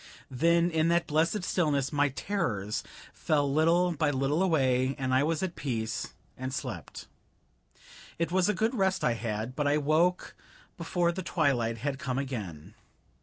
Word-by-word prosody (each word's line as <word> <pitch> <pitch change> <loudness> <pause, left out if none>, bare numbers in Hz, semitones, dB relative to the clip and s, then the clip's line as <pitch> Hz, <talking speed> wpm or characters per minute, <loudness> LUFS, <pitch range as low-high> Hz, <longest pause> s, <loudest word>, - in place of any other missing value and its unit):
Then 170 +6 +3
in 160 0 +2
that 170 0 +2
blessed 165 +6 +1
stillness 150 -7 0
my 145 0 +3
terrors 120 - -2 0.3
fell 145 -3 0
little 170 +4 +3
by 155 -2 0
little 140 +4 0
away, 135 -7 +2
and 130 -2 -1
I 130 - +4
was 160 +3 0
at 180 -2 -3
peace 115 -5 -3 0.2
and 130 +1 -5
slept. 135 - -6 1.1
It 170 0 -1
was 185 +1 +2
a 210 - +1
good 220 +3 +1
rest 190 -5 +1
I 120 - +3
had, 115 +1 -4
but 145 0 0
I 145 +1 +3
woke 155 +5 +1 0.4
before 170 0 0
the 190 +2 -5
twilight 120 -8 0
had 135 +3 -3
come 130 -5 -3
again. 105 - -5
150 Hz, 160 wpm, -29 LUFS, 130-170 Hz, 1.1 s, I